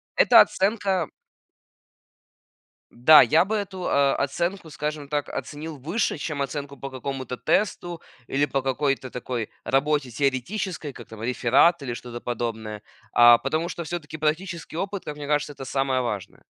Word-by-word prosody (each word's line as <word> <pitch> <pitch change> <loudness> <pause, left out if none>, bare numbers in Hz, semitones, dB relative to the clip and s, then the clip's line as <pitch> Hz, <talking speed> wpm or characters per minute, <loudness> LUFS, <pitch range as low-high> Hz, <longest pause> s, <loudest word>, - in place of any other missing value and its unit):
это - - +8
оценка 195 -4 +1 1.8
М, 120 - -20
да, 155 +1 +10
я 165 +3 +4
бы 215 +3 -1
эту, 190 -3 -4
э, 140 -1 +3
оценку, 170 +5 -2
скажем 150 -1 -4
так, 145 0 -2
оценил 155 +1 -6
выше, 165 - -1
чем 145 -1 -3
оценку 140 0 -4
по 135 - -6
какому-то 130 -1 -5
тесту 175 - 0 0.3
или 140 +2 +1
по 135 -1 -1
какой-то 135 0 -1
такой 120 -2 -4
работе 135 -1 +1
теоретической, 145 - -2
как 120 - -11
там 110 -1 -11
реферат 135 +7 +3
или 125 -3 -3
что-то 120 0 -7
подобное. 110 -3 -4 0.3
А, 120 0 +8
потому 155 +7 -2
что 170 - -5
всё-таки 155 -1 -6
практический 160 +2 -2
опыт, 195 +1 -3
как 150 - -5
мне 145 -1 -7
кажется, 145 0 0
это 135 - -9
самое 135 -1 0
важное. 105 -6 -5
145 Hz, 150 wpm, -25 LUFS, 130-165 Hz, 1.8 s, да